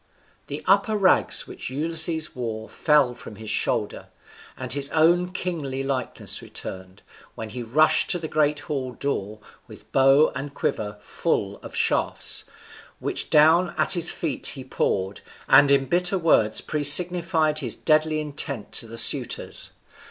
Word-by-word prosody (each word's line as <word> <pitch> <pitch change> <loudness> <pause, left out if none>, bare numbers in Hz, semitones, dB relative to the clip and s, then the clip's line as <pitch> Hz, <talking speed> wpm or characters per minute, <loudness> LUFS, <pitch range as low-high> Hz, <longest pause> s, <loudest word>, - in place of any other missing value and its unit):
The 145 - -7
upper 200 +3 +2
rags 190 -2 +3
which - - -8
Ulysses 160 +3 -2
wore 110 -3 -5
fell 150 -5 +1
from 110 - -12
his 110 +1 -6
shoulder, - - -2 0.5
and - - -2
his 140 0 +3
own 175 +3 +2
kingly 155 -8 -4
likeness 135 -2 -3
returned, 95 0 -8 0.3
when 110 - -7
he 125 - -6
rushed 140 +7 +2
to 180 - +1
the 165 -2 -6
great 150 -1 0
hall 130 -4 -5
door 110 -7 -4 0.3
with - - -15
bow 135 +3 +4
and 140 +1 -7
quiver 105 -1 -3
full - - -2
of - - -12
shafts, - - 0 0.5
which - - -4
down 160 +4 +4
at - - +2
his 175 -2 +2
feet 160 -5 -3
he 135 - -4
poured, 100 -6 -2 0.3
and 140 +1 +6
in 140 -1 +3
bitter 180 +5 +1
words 110 -11 +2
presignified 160 +1 +4
his 125 -6 -1
deadly 155 0 +1
intent 145 -5 -4
to 115 - +1
the 115 +1 -10
suitors. - - +1
145 Hz, 145 wpm, -23 LUFS, 125-165 Hz, 0.5 s, and